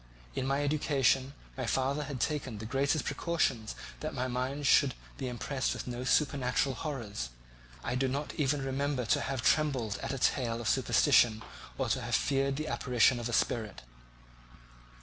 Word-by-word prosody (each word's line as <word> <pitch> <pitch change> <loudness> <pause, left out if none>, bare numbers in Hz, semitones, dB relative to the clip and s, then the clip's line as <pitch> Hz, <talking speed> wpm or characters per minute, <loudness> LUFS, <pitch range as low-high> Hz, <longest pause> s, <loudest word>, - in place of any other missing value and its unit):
In 130 - -2
my 140 +1 +1
education 140 -2 +2 0.2
my 130 -3 -3
father 135 +4 0
had 140 -2 -5
taken 130 -4 -2
the 110 - -6
greatest 135 +5 0
precautions 140 -7 -1 0.2
that - - -4
my 130 +1 -1
mind 130 +3 -2
should 135 -1 +5 0.2
be 135 - -2
impressed 130 +2 -2
with - - -6
no 125 0 -4
supernatural 135 -1 +2
horrors. 115 - -4 0.5
I 120 - -2
do 130 +1 +1
not 140 +3 -3
ever 145 0 +2
remember 135 -1 -1
to - - +2
have 130 -3 -3
trembled 130 -9 +2
at - - -3
a 135 - -2
tale 120 -3 +1
of 115 - -4
superstition 110 0 +4 0.3
or - - 0
to - - +1
have - - 0
feared 135 0 +1
the 155 +2 -3
apparition 125 -2 +3
of 120 0 -3
a - - -4
spirit. 110 - 0
130 Hz, 170 wpm, -31 LUFS, 120-140 Hz, 0.5 s, should